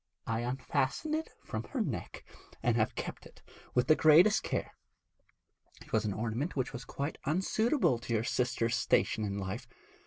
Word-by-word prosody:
'I 115 0 -1
unfastened 130 - -1
it 320 +1 -1 0.2
from - - -3
her 275 - -5
neck, 150 - -3 0.4
and 120 -2 +3
have 110 -2 +1
kept - - -5
it - - -20 0.3
with 125 0 +4
the 155 - +6
greatest 160 +8 +6
care. - - -2 1.1
It - - -16
was 110 -1 +2
an 105 - 0
ornament 115 - -2
which 130 -1 -1
was 125 -1 -6
quite 140 +6 -4
unsuitable 190 - +2
to 120 0 -4
your 110 - +1
sister's 115 -1 0
station 110 - +2
in 100 -1 -2
life. 100 +6 -4
125 Hz, 165 wpm, -32 LUFS, 115-155 Hz, 1.1 s, the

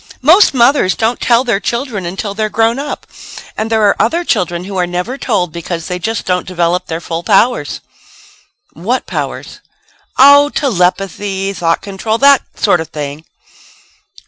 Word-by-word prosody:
Most 335 +2 +5
mothers 240 -5 +3
don't 230 +2 -1
tell 235 0 +3
their 230 -6 0
children 235 -6 -3
until 195 +3 -4
they're 215 +1 -2
grown 225 +4 +1
up. 290 +1 -5 0.5
And 220 +1 -3
there 220 -1 +1
are 205 - +4
other 330 +10 +1
children 180 - -1
who 195 +1 -7
are 180 -1 0
never 180 +8 -3
told 200 - -1
because 170 0 -5
they 180 0 -4
just 225 +4 -3
don't 180 -1 -1
develop 180 0 -1
their 165 0 -3
full 165 -1 -4
powers." 200 - +1 0.9
"What 225 +11 -2
powers?" - - -5 0.6
"Oh, 285 +2 +7
telepathy, 195 - -1
thought 165 -3 -1
control 205 +3 -2
that 280 +1 +5
sort 180 -6 +2
of 160 - -6
thing." 150 +1 -7
200 Hz, 155 wpm, -14 LUFS, 180-235 Hz, 0.9 s, Oh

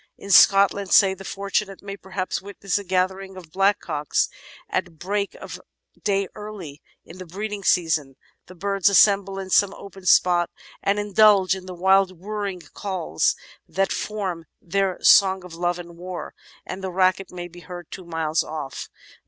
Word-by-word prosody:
In 200 - -7
Scot 195 -1 +7
land, 200 -2 -6
say, 195 -2 +6
the 195 0 -10
fortunate 195 0 -3
may 200 -1 -6
perhaps 190 -1 -4
witness 200 0 -3
a - - -7
gathering 190 +1 -1
of 170 -4 -12
blackcocks 190 -6 +1 0.4
at 170 -2 -3
break 200 +4 -2
of - - -9 0.4
day 200 -2 +1
early 200 -9 -9 0.2
in 175 +3 -13
the 185 - -7
breeding 205 +3 -5
season. 160 -8 +1 0.3
The 185 - -13
birds 195 +2 +1
assemble 195 -1 +4
in 190 -1 -6
some 200 +1 +3
open 195 -1 -11
spot 175 -1 +4 0.3
and 200 +1 +1
indulge 205 -2 +4
in 185 -1 -10
the 180 - -7
wild 190 0 +3
whirring 200 -1 -4
calls 185 - -1 0.3
that 195 0 0
form 190 -6 -3
their 190 +1 -1
song 190 -2 +6
of 180 - -11
love 175 +1 -1
and 170 -1 -10
war, 180 +1 -7 0.3
and 190 +1 -7
the 190 - -2
racket 185 +1 +1
may 175 -1 -6
be 175 0 -14
heard 175 0 -10
two 185 - -8
miles 160 -1 0
off. 150 -4 -6
190 Hz, 165 wpm, -23 LUFS, 175-200 Hz, 0.4 s, Scot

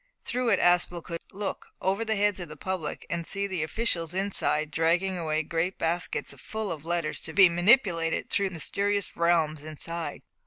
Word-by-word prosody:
Through 250 -1 0
it - - +4
Aspel 175 -1 +3
could 170 -1 -6
look 200 0 -4
over 195 +4 0
the 220 -1 0
heads 205 -1 +2
of 175 -3 -6
the 150 - -9
public 185 -2 -4
and 170 0 -2
see 200 0 -1
the 190 -4 -2
officials 170 0 0
inside 185 -6 0
dragging 170 +4 +2
away 155 -2 -1
great 165 +4 -1
baskets 170 +2 -1
full 220 -3 -4
of 155 -3 -5
letters 170 -2 -1
to 160 - -6
be 190 -1 +8
manipulated 175 -2 +3
in 200 - +1
the 190 - -7
mysterious 200 +4 -1
realms 160 -3 +2
inside. 160 +2 -5
175 Hz, 180 wpm, -28 LUFS, 165-195 Hz, -, be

